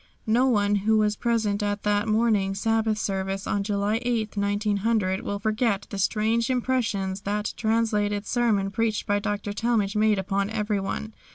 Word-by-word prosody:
No 240 +4 +3
one 205 -4 +2
who 215 +2 +2
was 210 0 +2
present 220 -3 0
at 205 0 -2
that 205 +1 +1
morning 215 -3 +2
Sabbath 220 +1 +1
service 195 -1 -2
on 205 - 0
July 205 +1 0
8, 230 -4 -1
1900, 205 -1 0
will 200 - -3
forget 215 -1 0
the 200 - -4
strange 225 +4 +1
impressions 225 -7 -1
that 210 +1 -2
translated 215 -2 0
sermon 215 -6 +1
preached 225 0 -1
by 205 0 +1
Dr. 205 0 -3
Talmage 215 -2 0
made 215 0 +3
upon 195 +1 -1
everyone. 210 0 -2
210 Hz, 155 wpm, -25 LUFS, 200-225 Hz, -, No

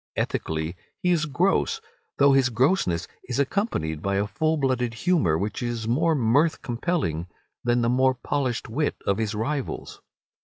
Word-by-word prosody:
Ethically 80 +2 -2 0.3
he 180 - +3
is 165 -2 +2
gross, 190 - +1 0.4
though 140 0 +6
his 135 -2 +4
grossness 115 - +1 0.2
is 125 - -3
accompanied 135 - -1
by 100 +2 0
a 100 +1 +1
full 155 +10 0
blooded 125 -4 0
humour 115 - +2
which 100 +5 -3
is 120 -2 -3
more 160 +7 +2
mirth 140 +6 +2
compelling 120 - -1 0.4
than 120 0 +2
the - - +2
more 130 +1 +3
polished 130 -1 -2
wit 145 +7 -1
of 100 +2 +1
his 110 -1 -1
rivals. 130 +5 -3
125 Hz, 155 wpm, -25 LUFS, 105-150 Hz, 0.4 s, though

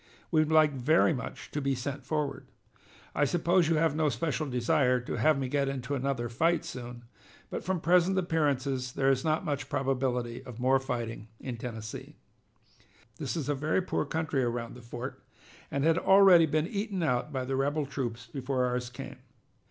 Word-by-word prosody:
We 155 -2 +4
would 155 0 0
like 155 -1 +6
very 155 +6 +3
much 125 -5 -7
to 145 - -2
be 135 -1 0
sent 140 +2 -4
forward. 150 -3 -2 0.7
I - - +1
suppose 170 +3 +2
you 165 - +3
have 155 -1 +2
no 155 -1 +2
special 150 +4 -2
desire 125 +1 +2
to 125 - -5
have 155 -2 +4
me 135 -1 -2
get 140 +1 0
into 135 0 -4
another 135 -3 -1
fight 165 +9 +1
soon, 120 -1 -7 0.5
but - - -4
from 185 -1 -1
present 180 +3 +3
appearances 140 -7 0
there 135 -1 +3
is 130 -1 0
not 155 +3 0
much 145 -3 -2
probability 125 -2 -1
of 125 -3 -10
more 130 +2 +3
fighting 120 -5 -4
in 125 -3 -5
Tennessee. 110 -2 -7 1.0
"This - - -3
is 145 -4 -3
a 145 - +2
very 155 +6 0
poor - - -1
country 160 -4 -1
around 120 -1 -2
the 125 - -11
fort, 125 +3 -7 0.5
and 140 - -1
had 165 +1 +4
already 190 -4 +7
been 155 +1 +1
eaten 200 -1 -2
out 125 +1 0
by 130 -2 -2
the 135 +1 -2
rebel 145 +3 0
troops 120 -4 -4
before 130 +1 -1
ours 125 -1 -2
came. 125 - -9
135 Hz, 185 wpm, -29 LUFS, 125-155 Hz, 1.0 s, already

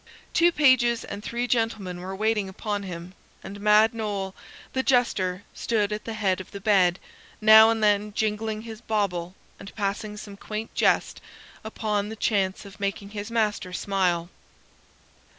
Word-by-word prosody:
Two 345 +1 +5
pages 260 -6 +4
and 205 +1 -7
three 240 +2 -2
gentlemen 220 -7 -1
were 190 +2 -6
waiting 210 -1 0
upon 205 +1 -3
him, 180 -2 -7 0.3
and 200 +1 -8
Mad 210 +2 +5
Noll, 205 -4 -3 0.4
the 260 - +1
jester, 205 -8 +1
stood 215 -3 0
at 210 - -5
the 225 - -4
head 190 -3 0
of 185 - -12
the 200 - -8
bed, 190 -3 +3 0.4
now 220 0 +8
and 225 -1 0
then 210 0 +2
jingling 215 +1 -2
his 225 -1 -9
bawble 190 -6 -2 0.2
and 200 - -11
passing 210 +1 -3
some 205 -1 -9
quaint 215 +2 -6
jest - - +1 0.4
upon 210 -2 -2
the 220 - -6
chance 200 -3 0
of 200 - -13
making 200 0 -3
his 210 0 -5
master 215 -5 -1
smile. 180 -3 0
210 Hz, 155 wpm, -25 LUFS, 195-220 Hz, 0.4 s, now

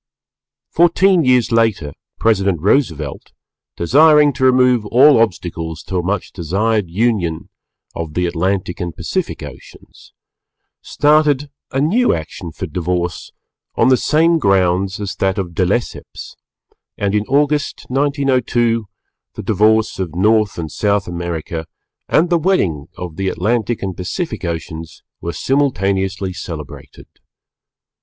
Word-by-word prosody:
Fourteen 175 +1 +4
years 125 -2 +3
later 110 -11 +1 0.2
President 100 -6 +1
Roosevelt, 80 - -1 0.4
desiring 150 - +5
to 130 +1 -4
remove 125 -2 +4
all 135 +3 +6
obstacles 85 -6 -3
to 95 - -4
a - - +1
much 100 +4 -2
desired 100 +3 -1
union 90 -5 -1 0.4
of 80 -2 -6
the 90 - +1
Atlantic 90 +1 -2
and 85 -3 -4
Pacific - - -3
Oceans, - - -13 0.7
started 145 -1 +2 0.2
a 135 - -2
new 205 - +2
action 80 +2 -7
for 90 - -6
divorce 90 +1 -3 0.4
on - - +3
the 130 - +6
same 165 +5 +2
grounds 95 - +1
as 100 -2 -4
that 95 +1 0
of 90 -3 -3
De 90 +1 +1
Lesseps, 120 +5 -4 0.6
and 100 -1 -1
in 105 0 +1
August, 145 +1 0
1902, 125 -5 +1 0.5
the - - -6
divorce 110 +1 +2
of 90 -4 -4
North 105 +2 +2
and 80 -3 -5
South 100 -1 0
America 85 -2 -5 0.4
and 170 +3 +2
the 170 - +3
wedding 95 - 0
of 90 -3 -7
the 95 0 -2
Atlantic 110 +4 -1
and 95 -2 -3
Pacific 160 - -4
Oceans 80 -1 -6 0.2
were 85 - -3
simultaneously 95 -8 0
celebrated. 75 -5 -9
100 Hz, 125 wpm, -17 LUFS, 85-130 Hz, 0.7 s, all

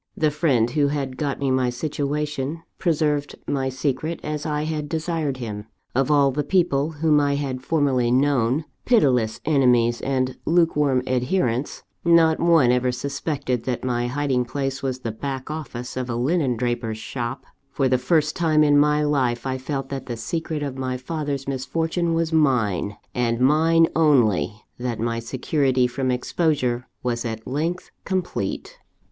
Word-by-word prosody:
The 155 -1 +2
friend 135 -7 +2
who 145 +1 +2
had 140 -2 -2
got 140 0 -2
me 135 -2 0
my 130 -1 +2
situation, 150 +2 -3 0.2
preserved 150 -4 0
my 135 -2 0
secret 140 +5 -2
as 150 0 -3
I 150 0 -1
had 155 -1 -3
desired 160 -4 -2
him; 105 -4 -6 0.3
of 135 +3 +1
all 140 -2 +4
the 145 +3 -1
people 160 -2 +1
whom 150 -2 +5
I 145 -1 +1
had 135 -3 -3
formerly 135 -4 +1
known, 130 +2 +2 0.2
pitiless 125 - +2
enemies 125 -6 +3
and 130 -1 -1
lukewarm 150 -6 +2
adherents, 125 0 -1 0.2
not 165 -2 +5
one 165 -7 +5
ever 125 0 +2
suspected 140 0 -3
that 125 -2 -2
my 120 -1 0
hiding 135 -1 0
place 135 +2 -3
was 130 -1 -3
the 115 - -3
back 135 +4 -5
office 125 -6 -6
of 130 -1 -3
a 120 - -1
linen 130 0 +1
draper's 120 -2 -2
shop. 120 +3 -5 0.2
For 135 -1 0
the 130 -1 +2
first 155 +3 +1
time 155 -3 +3
in 145 -1 +5
my 150 +1 +3
life, 130 -5 0
I 130 0 -2
felt 135 0 -4
that 135 -1 -5
the 120 -2 -4
secret 160 +4 -3
of 135 -2 -4
my 130 -1 -2
father's 140 0 -4
misfortune 160 +6 -1
was 165 0 0
mine, 110 - +1 0.2
and 115 -1 0
mine 160 +5 +4
only; 120 - +2 0.2
that 120 -2 -3
my 115 +1 -1
security 130 +2 +1
from 130 +1 -1
exposure 125 -1 0 0.2
was 120 -1 -1
at 110 -2 -5
length 160 +7 -3
complete. 190 - -3
135 Hz, 160 wpm, -23 LUFS, 125-150 Hz, 0.3 s, whom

